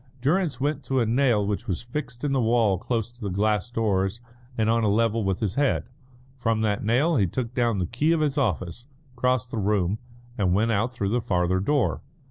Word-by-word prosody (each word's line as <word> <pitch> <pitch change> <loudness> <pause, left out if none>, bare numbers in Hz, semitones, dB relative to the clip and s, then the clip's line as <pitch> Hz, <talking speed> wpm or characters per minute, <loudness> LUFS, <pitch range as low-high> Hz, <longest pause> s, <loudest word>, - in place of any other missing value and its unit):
Durrance 155 +2 +1
went 145 +1 -1
to 135 -1 +1
a 120 - +2
nail 115 -3 +2
which 100 0 -3
was 90 +1 -2
fixed 125 0 -6
in 145 - 0
the 135 -2 +2
wall 110 -5 +2
close 115 +1 -2
to 120 - -23
the 100 - -2
glass 105 +3 0
doors 105 -3 0 0.4
and 110 -1 +1
on 115 0 +2
a 105 - +3
level 115 +1 +2
with 95 +1 -1
his 105 -4 0
head. 140 +2 0 0.5
From 115 -2 +1
that 105 -2 0
nail 135 +9 +2
he 100 -5 +3
took 120 +6 -4
down 120 -4 +1
the 90 - 0
key 135 - 0
of 165 - +2
his 145 -2 +1
office, 105 - -2 0.3
crossed 125 0 0
the 115 - -2
room, 100 -1 +1 0.4
and 90 -3 +2
went 110 +3 +2
out 110 +3 +1
through 105 -6 -2
the 120 +3 +1
farther 90 -2 +1
door. 95 - +1
115 Hz, 215 wpm, -25 LUFS, 100-125 Hz, 0.5 s, a